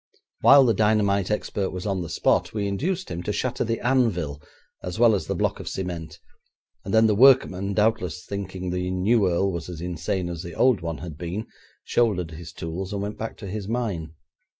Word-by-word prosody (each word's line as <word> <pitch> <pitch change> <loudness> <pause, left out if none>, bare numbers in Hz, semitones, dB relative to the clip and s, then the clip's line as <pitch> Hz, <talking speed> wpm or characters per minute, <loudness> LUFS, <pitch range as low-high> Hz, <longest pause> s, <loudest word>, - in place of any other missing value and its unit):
While 140 -1 +7
the 115 - +4
dynamite 100 -2 +2
expert 105 -2 -1
was 90 +1 -6
on 95 -3 -1
the 85 - -5
spot, - - +1
we 100 -1 -1
induced 175 - -2
him 85 - -3
to 95 - -2
shatter 125 +4 -1
the 115 0 -1
anvil 100 - +1 0.4
as 90 +2 -5
well 115 -1 +6
as 100 - -1
the - - -1
block - - -1
of - - -8
cement, 85 -4 -5 0.7
and 95 - -5
then 110 +1 +5
the 110 - +4
workman, 100 -5 +4
doubtless 90 -6 0
thinking 95 -2 -5
the 90 0 -2
new 95 +2 +2
earl 95 +3 +1
was 85 -1 -5
as 85 -3 -7
insane 90 +1 -2
as 85 -2 -5
the 85 -2 -8
old 125 -6 +3
one 85 -2 -4
had 75 +1 -8
been, 90 +5 -4 0.4
shouldered 95 -8 +1
his 80 +1 -9
tools, 90 +5 -5
and 100 0 -2
went 105 +1 -5
back 110 - -5
to 100 - -8
his 100 +1 -5
mine. 100 -9 -3
95 Hz, 200 wpm, -25 LUFS, 85-110 Hz, 0.7 s, While